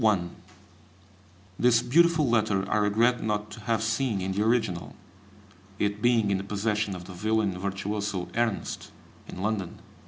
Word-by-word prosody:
[Footnote 110 -3 +4
1: 85 0 -8 1.2
This 120 -1 +4
beautiful 160 +3 +4
letter 105 -5 +1
I - - +3
regret 110 +4 +2
not 105 -1 -2
to - - -9
have 115 -1 +1
seen 115 -1 0
in 95 +1 -2
the 100 +2 -1
original, 110 -6 0 0.8
it 105 +1 -1
being 115 -4 +3
in 95 - +1
the - - -5
possession 105 0 -1
of 90 -1 -8
the 90 - -9
violin 105 +1 0
virtuoso 100 0 -3
Ernst, 115 -3 -2 0.4
in 90 - -7
London. 105 -4 -2
105 Hz, 155 wpm, -27 LUFS, 100-115 Hz, 1.2 s, Footnote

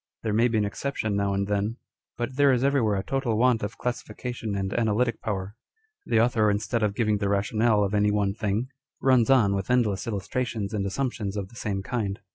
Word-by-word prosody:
There 110 -2 -1
may 115 +3 +4
be 115 -2 0
an 105 - +2
exception 110 -1 -2
now 100 0 0
and 100 0 0
then, 105 +3 -1 0.4
but 120 +2 -3
there 140 0 +5
is 125 -1 +1
every 140 -1 +3
where 105 -3 +1
a 95 - -2
total 130 -4 -1
want 120 -1 +3
of 105 +2 -4
classification 120 -2 -4
and 95 -1 -2
analytic 115 +1 +1
power. 100 -2 -3 0.5
The 115 - +3
author, 115 -2 +3
instead 105 +3 0
of 105 -2 0
giving 105 -3 +1
the 100 -1 0
rationale 105 +2 +2
of 100 0 -1
any 105 0 +3
one 105 -1 +1
thing, 110 +3 -2 0.3
runs 130 -3 +3
on 115 -7 +5
with 95 -1 -3
endless 120 -4 +1
illustrations 110 0 -3
and 100 -2 -1
assumptions 105 -3 -2
of 95 -2 -4
the 115 - -17
same 100 -4 -3
kind. 100 -4 -2
110 Hz, 210 wpm, -26 LUFS, 100-120 Hz, 0.5 s, there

